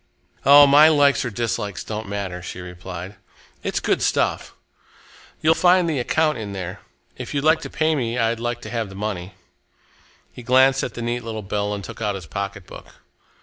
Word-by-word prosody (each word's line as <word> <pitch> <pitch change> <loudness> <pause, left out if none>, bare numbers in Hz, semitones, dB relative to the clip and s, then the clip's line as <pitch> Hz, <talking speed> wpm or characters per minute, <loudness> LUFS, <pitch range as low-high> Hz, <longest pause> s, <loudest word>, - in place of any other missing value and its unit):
"Oh! 145 +1 +9
my 145 +2 +7
likes 145 -3 +4
or 125 - -2
dislikes 105 -3 -3
don't 110 -2 -6
matter," 95 -3 -4
she 90 - -7
replied. 90 +1 -8 0.4
"It's - - -2
good - - 0
stuff. - - 0 0.9
You'll 160 +1 +5
find 180 0 +4
the 155 -5 -1
account 155 +2 +1
in 105 -2 -6
there. 95 -2 -6 0.4
If - - -6
you'd 140 - 0
like 160 +1 +4
to - - -7
pay 155 +2 +1
me, 120 -5 -2
I'd 115 -1 0
like 120 0 -3
to - - -8
have 115 -4 -3
the 95 - -11
money." 95 -2 -5 1.0
He - - -10
glanced 130 +2 +4
at 120 - -5
the 120 - -5
neat 120 +1 -2
little 110 -2 -5
bill 105 +1 -2
and 100 -1 -4
took 90 - -9
out 105 -2 -1
his 95 -3 -8
pocketbook. 100 +1 -7
115 Hz, 190 wpm, -22 LUFS, 100-140 Hz, 1.0 s, Oh